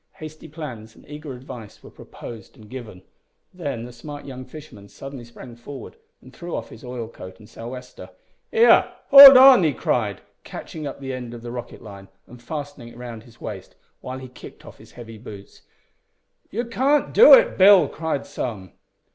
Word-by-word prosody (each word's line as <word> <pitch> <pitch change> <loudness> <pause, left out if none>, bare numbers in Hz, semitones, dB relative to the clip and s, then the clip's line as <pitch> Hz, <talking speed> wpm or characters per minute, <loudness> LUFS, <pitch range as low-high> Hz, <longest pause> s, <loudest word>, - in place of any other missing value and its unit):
Hasty 155 0 -11
plans 125 -9 -10
and - - -20
eager 150 0 -9
advice 125 -4 -12
were - - -14
proposed 115 -5 -12
and 110 - -16
given. 110 -8 -10 0.5
Then 140 -10 -6
the 125 - -11
smart 145 +5 -10
young 130 -2 -9
fisherman 125 -8 -13
suddenly 135 +4 -10
sprang 120 +1 -13
forward, 135 - -11 0.3
and - - -16
threw 175 -1 -7
off - - -6
his - - -14
oil 125 -2 -7
coat 95 -4 -12
and 105 - -17
sou' 115 - -11
wester. 125 +1 -10 0.4
"Here! 460 +1 +4 0.2
hold 275 -1 +12
on!" 260 -4 +8
he 155 -4 +1
cried, - - -2 0.2
catching 155 -2 -8
up 140 - -9
the 135 -1 -5
end 125 -2 -7
of 115 - -12
the 120 - -7
rocket 120 -1 -9
line, 100 -3 -12 0.2
and 120 0 -16
fastening 145 -2 -8
it 120 - -14
round 120 -2 -9
his 115 +1 -20
waist, 100 -4 -9 0.2
while 130 +1 -8
he 130 0 -10
kicked 125 - -14
off - - -14
his - - -18
heavy 115 -2 -12
boots. 105 -4 -13 0.9
"You 235 +4 -4
can't 265 +5 0
do - - +9
it, - - +2
Bill," 190 -4 +6
cried 160 -2 -4
some. 100 -7 -6
130 Hz, 185 wpm, -22 LUFS, 115-155 Hz, 0.9 s, hold